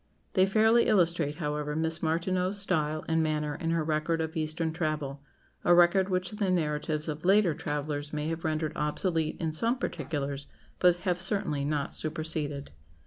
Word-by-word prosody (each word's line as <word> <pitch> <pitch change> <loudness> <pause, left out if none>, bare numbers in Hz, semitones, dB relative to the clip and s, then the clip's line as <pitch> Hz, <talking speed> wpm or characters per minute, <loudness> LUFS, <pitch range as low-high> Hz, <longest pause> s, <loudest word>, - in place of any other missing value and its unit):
They 190 -1 +4
fairly 220 +4 +4
illustrate, 170 -6 +3
however, 150 -2 -2
Miss 160 +1 -1
Martineau's 180 +4 0
style 155 -6 0
and 160 0 +2
manner 150 -1 0
in 165 +3 -3
her 165 -1 +1
record 155 +1 0
of 160 0 -3
Eastern 160 +1 -1
travel 155 -4 -2 0.4
a 175 - +5
record 175 +2 +5
which 185 -1 -1
the 205 -2 -1
narratives 155 -2 0
of 155 0 -4
later 195 -2 +4
travellers 145 0 -3
may 150 0 -2
have 165 0 -4
rendered 155 -1 -1
obsolete 155 +1 0
in 160 -2 -1
some 230 +11 +1
particulars, 140 - -3 0.3
but 180 -1 +5
have 180 -2 0
certainly 190 -7 -1
not 145 -1 -1
superseded. 155 -2 -3
160 Hz, 160 wpm, -29 LUFS, 150-180 Hz, 0.4 s, a